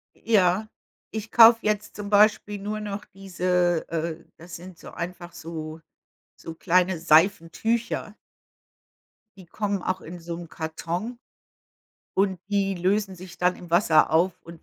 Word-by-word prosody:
Ja, 205 -1 +2 0.4
ich 220 0 -6
kaufe 230 0 +8
jetzt 215 0 -1
zum 205 -1 -6
Beispiel 210 0 +3
nur 210 +2 -4
noch 210 0 -5
diese 180 -3 -1
äh, 165 0 -4
das 170 +1 -10
sind 180 0 -11
so - - -12
einfach 175 0 -7
so 160 -1 -7 0.6
so 165 - -9
kleine 180 +1 +2
Seifentücher 200 +7 +1 1.2
die 185 - -13
kommen 200 +2 -3
auch 185 0 -2
in 175 +2 -9
so 170 0 -6
'nem 170 -2 -9
Karton 170 +9 -5 1.0
und 190 -2 +1
die 195 -1 0
lösen 195 +2 0
sich 180 0 -12
dann 180 0 +2
im 175 -2 -12
Wasser 165 -3 +4
auf 170 +3 +3
und 170 -1 -13
185 Hz, 140 wpm, -25 LUFS, 170-205 Hz, 1.2 s, kaufe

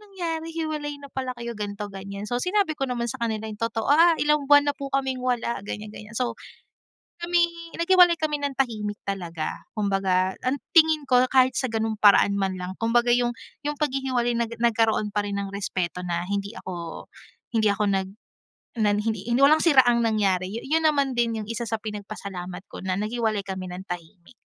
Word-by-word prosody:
nangyari? 340 -6 -4
Hiwalay 305 -3 -3
na 280 - -9
pala 260 -1 -3
kayo? 235 0 -4
Ganto, 205 0 -4
ganyan." 200 +1 -7
So, 245 - -1
sinabi 380 -2 +1
ko 270 - 0
naman 240 -1 -2
sa 260 - -5
kanila 220 -1 -2
yung 210 - -7
totoo, 225 0 -2
"Ah, 335 +4 +7
ilang 300 -1 +2
buwan 290 0 +6
na 285 - +1
po 275 -1 -6
kaming 265 -1 0
wala, 245 -2 0
ganyan 210 +1 -6
ganyan." 210 +1 -11
So, 250 -1 -1 0.9
kami 345 0 +3 0.3
naghiwalay 350 -1 +5
kami 300 -2 -1
ng 280 -2 -2
tahimik 215 -5 -1
talaga. 175 -5 -4
Kung 210 -1 0
baga, 190 -1 +1
ang 265 +3 +1 0.2
tingin 315 -3 +5
ko, 250 0 +5
kahit 260 -1 +4
sa 260 -3 -1
ganung 225 0 -1
paraan 200 -1 +6
man 190 -1 0
lang 180 +1 -5
kung 225 0 0
baga, 240 0 +4
yung 245 0 +2 0.4
yung 295 -1 -2
paghihiwalay 260 -4 0
na 235 - +1
nagkaroon 225 -3 +2
pa 210 - +2
rin 200 0 -3
ng 200 -1 -3
respeto 180 -2 -3
na 175 0 -2
hindi 200 +2 -3
ako 170 -3 -7 0.5
hindi 215 -2 +3
ako 200 +1 0
nag 190 -1 0 0.7
na 215 -2 +3
hi 210 - -1
hindi 220 -3 0
hindi, 240 - +2
walang 310 +2 +5
siraang 250 -7 +5
nangyari. 195 -4 +1
Yun 315 +6 0
naman 280 -4 +2
din 230 -2 +1
yung - - -9
isa 230 +1 -3
sa 225 - -1
pinagpasalamat 200 -4 -7
ko - - -8
na 185 0 -1
naghiwalay 215 -1 -1
kami 190 -1 -5
ng 185 +2 -8
tahimik. 175 +4 -8
230 Hz, 195 wpm, -25 LUFS, 200-275 Hz, 0.9 s, Ah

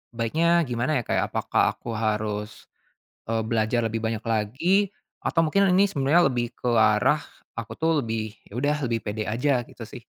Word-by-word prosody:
baiknya 165 +9 +2
gimana 125 +2 -1
ya - - -4
Kak, - - -1
ya, - - +2
apakah - - 0
aku 120 - -7
harus, 105 -1 -3 0.6
eee 115 0 0
belajar 115 +1 0
lebih 115 0 -1
banyak 110 0 -3
lagi? 130 - +1 0.4
Atau 165 0 +2
mungkin 195 +5 +3
ini 195 +1 +4
sebenarnya 145 +4 +3
lebih 120 -1 -3
ke 125 - -1
arah 110 +5 +4 0.4
aku 115 - -6
tuh 165 0 +1
lebih, 110 -1 -3 0.2
"Ya 100 - -12
udah 145 +4 0
lebih 115 -1 0
pede 105 0 -3
aja," 125 +5 +1
gitu 115 - -11
sih. 120 +1 -10
115 Hz, 175 wpm, -25 LUFS, 110-150 Hz, 0.6 s, ini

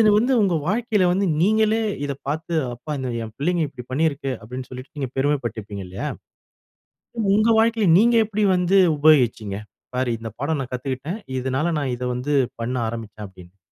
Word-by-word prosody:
இது 215 -1 +6
வந்து 245 +5 +3
உங்க 190 -4 +2
வாழ்க்கைல 215 -1 +1
வந்து 195 +1 +1
நீங்களே 220 +3 +3 0.2
இத 140 - -2
பாத்து, 160 +3 -3 0.2
"அப்பா! 150 +6 -7
இந்த 130 -1 -3
என் 110 -1 -7
பிள்ளைகங்க 170 +3 +1
இப்டி 125 -3 -10
பண்ணியிருக்கு" 140 -1 0
அப்டின்னு 125 +3 -7
சொல்லிட்டு 130 +1 -9
நீங்க 135 -3 -2
பெருமைப்பட்டிப்பீங்க 120 -8 -2
இல்லயா? 95 +2 -4 1.3
உங்க 215 +2 +3
வாழ்க்கையில 225 -3 +3
நீங்க 235 +2 +4
எப்டி 215 0 -1
வந்து 180 +2 +3 0.2
உபயோகிச்சீங்க? 120 -9 +3 0.4
"பாரு 130 -1 0
இந்த 115 -1 -6
பாடம் 145 0 0
நான் 125 - -9
கத்துக்கிட்ட. 130 +4 -4 0.3
இதனால 135 +6 0
நான் 130 -3 -1
இத 125 - -5
வந்து 140 +4 -2 0.3
பண்ண 125 +2 -2
ஆரம்பிச்சேன்" 110 -2 -7
அப்டின்னுட்டு 90 -2 -15
வந்து. 95 - -41
140 Hz, 165 wpm, -22 LUFS, 125-185 Hz, 1.3 s, இது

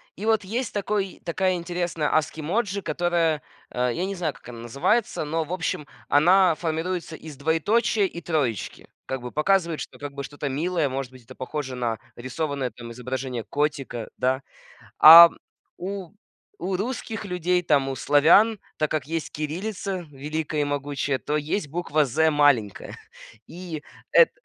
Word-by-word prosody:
И 205 - -6
вот 220 -2 +2
есть 230 +5 -3
такой 205 -1 -2
такая 185 +2 0
интересная 175 -3 -2
ASCII 155 0 0
emoji, 200 +4 -1
которая 165 -2 0 0.3
а 125 0 0
я 175 +9 -2
не 195 +1 -4
знаю, 165 -5 -2
как - - -17
она 115 -1 -9
называется, 140 - 0
но, 160 +2 -1
в 155 - -10
общем, 165 -4 -3 0.2
она 175 +4 +5
формируется 165 +1 -3
из 155 -3 -10
двоеточия 195 - +2
и 170 -2 -5
троечки. 145 - -2 0.2
Как 130 -1 -4
бы 125 0 -7
показывает, 170 0 +1
что, - - -9
как 145 -1 -6
бы, 140 0 -5
что-то 145 0 -5
милое, 160 +3 0
может 130 -1 -4
быть, 130 -1 -15
это 130 +3 -13
похоже 130 0 -5
на 120 -3 -2 0.2
рисованное, 130 +1 -3
там, 115 +1 -10
изображение 125 0 -4
котика, 140 -2 -2
да. 130 +1 +1 0.6
А 170 +2 +12 0.5
у 190 -1 -5 0.5
у 190 0 -2
русских 225 +1 -4
людей, 180 -2 0
там, 140 -4 +2
у 135 - -3
славян, 175 +11 +5 0.2
так 155 - 0
как 150 -4 -1
есть 165 -1 -3
кириллица 180 +3 -4
великая 150 +2 -3
и - - +2
могучая, 145 -1 -2
то 150 - -2
есть 150 +4 -1
буква 155 -1 0
"з" 160 +5 +2
маленькая. 145 -9 +2 0.5
И, 170 -3 -7 0.3
эт 485 - +7
155 Hz, 160 wpm, -25 LUFS, 140-180 Hz, 0.6 s, А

